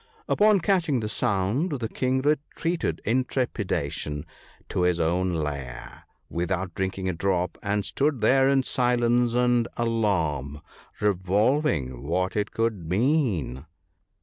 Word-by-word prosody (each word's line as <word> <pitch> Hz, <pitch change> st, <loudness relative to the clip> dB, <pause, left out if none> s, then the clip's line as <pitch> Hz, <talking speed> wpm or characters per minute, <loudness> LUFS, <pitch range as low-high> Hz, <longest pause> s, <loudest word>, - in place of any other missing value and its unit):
Upon 210 Hz, -1 st, +4 dB
catching 170 Hz, -8 st, +2 dB
the 110 Hz, -, -3 dB
sound 105 Hz, -, 0 dB
the 120 Hz, -5 st, -2 dB
king 130 Hz, +3 st, 0 dB
retreated 150 Hz, -, -1 dB
in 125 Hz, +5 st, +2 dB
trepidation 100 Hz, -, -2 dB, 0.4 s
to -, -, -1 dB
his 90 Hz, -1 st, +2 dB
own 90 Hz, +3 st, +1 dB
lair, 70 Hz, -5 st, -5 dB, 0.2 s
without 90 Hz, +1 st, -2 dB
drinking 95 Hz, 0 st, -2 dB
a 95 Hz, -, 0 dB
drop, 90 Hz, +1 st, 0 dB
and 100 Hz, 0 st, -1 dB
stood 140 Hz, -2 st, 0 dB
there 135 Hz, +5 st, +4 dB
in 135 Hz, -1 st, +3 dB
silence 120 Hz, -1 st, +2 dB
and 120 Hz, -1 st, +3 dB
alarm, 80 Hz, -, 0 dB, 0.4 s
revolving 100 Hz, -, +1 dB
what 90 Hz, +6 st, -1 dB
it 105 Hz, -1 st, 0 dB
could 110 Hz, -8 st, -2 dB
mean. 95 Hz, -, 0 dB
105 Hz, 120 wpm, -26 LUFS, 90-130 Hz, 0.4 s, Upon